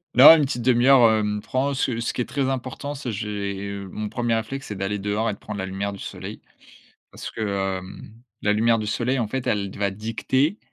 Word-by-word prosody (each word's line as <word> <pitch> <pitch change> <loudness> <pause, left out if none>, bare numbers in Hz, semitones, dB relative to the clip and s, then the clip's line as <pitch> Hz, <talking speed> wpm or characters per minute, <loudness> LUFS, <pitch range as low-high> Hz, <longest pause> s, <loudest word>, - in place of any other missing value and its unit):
Non, 135 +6 +11
une 150 -3 +2
petite 125 -3 -3
demi-heure, 125 -1 +6
hem, 105 -1 0
prend, 135 +5 -1
ce 125 -3 -1
ce 120 +1 -2
qui - - -2
est - - -1
très 135 -2 -1
important, 135 +2 -4
c'est 130 -4 -4
j'ai, 100 -1 -4
hem, 100 -1 -7
mon 105 0 -4
premier 120 +1 0
réflexe, 135 +5 -4
c'est 105 - -5
d'aller 100 +1 -2
dehors 105 +3 -1
et - - -1
de 100 - -10
prendre 105 -1 -6
la 95 - -2
lumière 100 +1 -3
du 100 - -10
soleil. - - -7 0.7
Parce - - -7
que, 100 -3 -2
hem, 95 +3 -11 0.3
la 105 - +3
lumière 115 +2 +3
du 110 - -3
soleil, 125 +5 0
en 115 - -1
fait, 130 +3 -3
elle 100 -2 -1
va 100 -1 +1
dicter 115 - -1
110 Hz, 225 wpm, -24 LUFS, 100-130 Hz, 0.7 s, Non